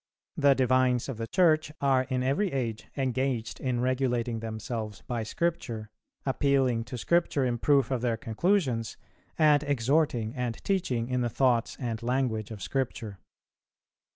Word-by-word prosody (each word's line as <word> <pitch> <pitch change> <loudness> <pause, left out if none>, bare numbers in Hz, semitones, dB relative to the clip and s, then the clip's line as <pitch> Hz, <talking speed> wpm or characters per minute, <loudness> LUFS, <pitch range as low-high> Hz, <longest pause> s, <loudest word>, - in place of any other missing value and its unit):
The 140 -1 +4
divines 130 -1 +2
of 130 - -4
the 115 0 -4
Church 155 -1 +3
are 135 -2 +2
in 130 -1 0
every 155 +9 +1
age 120 -5 -3
engaged 130 -3 -1
in 125 -2 -1
regulating 125 -2 0
themselves 110 -1 -5
by 120 -2 -2
Scripture, 110 -4 -3 0.3
appealing 135 -4 +1
to 120 +3 -6
Scripture 165 -1 +1
in 120 -1 -1
proof 140 -2 +3
of 130 -3 0
their 120 -2 0
conclusions, 130 - 0 0.4
and 150 -2 +5
exhorting 135 -4 +1
and 125 -3 -2
teaching 135 -12 0
in 125 0 0
the 120 - 0
thoughts 120 -1 +1
and 115 -4 -3
language 120 -3 -1
of 105 -4 -7
Scripture. 115 -7 -3
125 Hz, 145 wpm, -28 LUFS, 115-140 Hz, 0.4 s, and